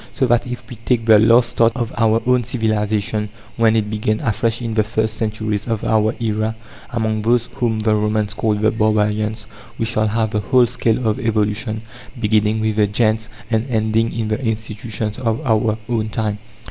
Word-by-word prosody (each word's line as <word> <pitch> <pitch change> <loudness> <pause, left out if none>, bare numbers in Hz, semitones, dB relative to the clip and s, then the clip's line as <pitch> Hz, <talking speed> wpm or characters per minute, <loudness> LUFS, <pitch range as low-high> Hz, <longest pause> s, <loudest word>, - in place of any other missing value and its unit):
So 135 - +2
that 120 0 +2
if 125 0 -7
we 120 - -9
take 115 0 0
the 110 -2 +7
last 115 +2 +4
start 115 -1 +3
of 120 -3 -3
our 115 0 +2
own 125 0 +3
civilization, 110 -2 -1 0.3
when 115 -1 +3
it 110 -2 +1
began 110 0 0
afresh 115 -2 0
in 115 -2 -3
the 110 -1 +2
first 110 0 -1
centuries 110 -1 -2
of 115 -3 -2
our 110 0 +2
era, 110 -1 -1 0.3
among 110 -2 -1
those 120 +2 +1
whom 120 -4 0
the 110 0 +2
Romans 105 0 0
called 105 -1 0
the 110 - +3
"barbarians," 110 0 0 0.3
we 115 - -1
shall 110 -1 +1
have 110 0 0
the 105 - 0
whole 125 +5 +4
scale 120 0 0
of 110 - 0
evolution, 110 0 -1 0.4
beginning 110 0 +2
with 110 -1 -1
the 105 -1 +4
gentes 110 +1 0 0.2
and 110 +2 +1
ending 110 0 +1
in 110 -2 -3
the 110 +5 -2
institutions 110 0 -3
of 115 -2 0
our 110 -2 +2
own 110 -3 -1
time. 105 -1 -2
110 Hz, 185 wpm, -19 LUFS, 105-115 Hz, 0.4 s, the